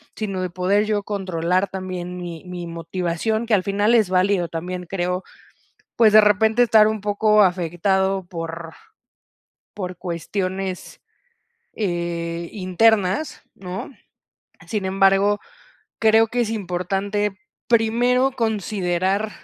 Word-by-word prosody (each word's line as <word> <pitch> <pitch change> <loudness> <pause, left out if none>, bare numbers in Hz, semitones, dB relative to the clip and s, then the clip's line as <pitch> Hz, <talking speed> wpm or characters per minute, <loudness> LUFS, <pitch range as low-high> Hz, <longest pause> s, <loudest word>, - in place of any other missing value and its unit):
sino 195 -4 -3
de 185 - -2
poder 190 +4 +1
yo 210 -1 -1
controlar 185 -2 -1
también 185 -1 -6
mi 170 -3 -7
mi 180 -1 -6
motivación, 175 +6 -2
que 230 - -1
al 195 -3 +3
final 205 +4 +1
es 215 -5 +3
válido 185 -1 +2
también, 180 +2 -5
creo, 180 0 -2 0.7
pues, 220 -3 +5
de 215 - +9
repente, 220 +3 +4
estar 220 -2 +5
un 215 -1 -2
poco 210 +1 +3
afectado 190 +2 0
por 165 -1 -7 1.0
por 185 -3 -6
cuestiones, 185 +1 -4 0.7
eh, 170 -3 -3
internas, 200 - +1
¿no? 185 +7 -7 0.8
Sin 210 -4 -2
embargo, 195 +2 +3 0.6
creo 220 0 +5
que 245 +2 -1
es 230 -2 0
importante 195 0 -2 0.3
primero 240 +3 +3
considerar 200 -3 -1
195 Hz, 115 wpm, -22 LUFS, 180-215 Hz, 1.0 s, de